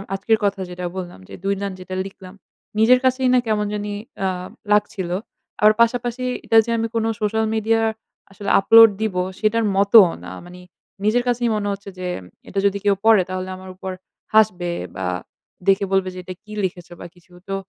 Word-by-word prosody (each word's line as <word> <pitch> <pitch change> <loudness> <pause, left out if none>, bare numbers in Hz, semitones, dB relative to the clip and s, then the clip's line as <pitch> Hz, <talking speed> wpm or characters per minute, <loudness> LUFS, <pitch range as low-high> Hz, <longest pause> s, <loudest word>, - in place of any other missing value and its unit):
আজকের 220 +3 +1
কথা 200 0 0
যেটা 180 0 -6
বললাম 175 - -7
যে - - -11
২ 195 - +1
লাইন 200 -1 -3
যেটা 185 0 -7
লিখলাম 190 -1 -13 0.5
নিজের 245 +3 +6
কাছেই 260 0 +2
না 250 - +5
কেমন 210 -1 +1
জানি 205 0 -3 0.3
আ - - +2 0.5
লাগছিল। 205 -3 0 0.5
আবার 215 0 +7
পাশাপাশি 240 +1 +1 0.2
এটা 225 - +3
যে 235 - -3
আমি 225 0 -1
কোন 225 -1 +1 0.2
সোশ্যাল 220 +1 +1
মিডিয়া 225 +1 +1 0.5
আসলে 200 +1 -6
আপলোড 225 +3 +8
দিব 215 -4 -1 0.2
সেটার 225 +1 +1
মতও 200 0 +7 0.2
না। 90 - -8
মানে 180 +1 -12 0.4
নিজের 225 +4 +2
কাছেই 240 -1 +1
মনে 205 -1 -2
হচ্ছে 200 0 -6
যে 180 - -4 0.4
এটা 195 - -2
যদি 200 0 +2
কেউ 200 -1 +4
পড়ে 220 -4 +6
তাহলে 185 0 -4
আমার 185 0 -11
উপর 190 0 -6 0.4
হাসবে। 185 -5 +3 0.2
বা 95 -1 -3 0.6
দেখে 195 +1 +4
বলবে 190 -1 +1
যে 185 - -8
এটা 185 - -7
কি 215 - -15
লিখেছ 175 -1 -6
বা - - -8
কিছু। 175 0 -24 0.2
তো 195 - -1
205 Hz, 185 wpm, -21 LUFS, 185-225 Hz, 0.6 s, আপলোড